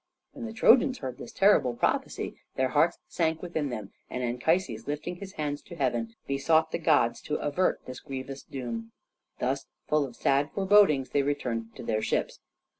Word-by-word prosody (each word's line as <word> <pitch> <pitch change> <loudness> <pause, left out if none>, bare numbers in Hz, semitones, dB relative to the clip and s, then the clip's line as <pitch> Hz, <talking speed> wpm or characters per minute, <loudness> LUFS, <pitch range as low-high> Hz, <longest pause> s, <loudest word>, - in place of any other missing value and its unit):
When 240 -4 -6
the - - -6
Trojans 255 +4 +5
heard 130 -2 -6
this - - -8
terrible 190 - +4
prophecy - - -1 0.2
their 130 0 +1
hearts 160 +5 +3
sank 160 -1 0
within 160 -5 -2
them, 110 -5 -6 0.2
and 125 - -3
Anchises, 125 0 0
lifting 150 +4 -3
his 195 +1 -9
hands 145 -3 -3
to 175 - -11
heaven, 120 -6 -1
besought 160 +4 +2
the - - -1
gods 155 -8 +3
to 150 - -3
avert 150 +6 0
this 130 -1 -7
grievous 135 0 -6
doom. 115 -4 -6 0.4
Thus, 135 +2 -1 0.2
full 150 -1 +3
of 120 - -13
sad 140 +2 +2
forebodings, 195 -9 +4
they 145 - +3
returned 120 -5 -2
to - - -8
their 110 -2 0
ships. - - -1
140 Hz, 175 wpm, -28 LUFS, 125-165 Hz, 0.4 s, Trojans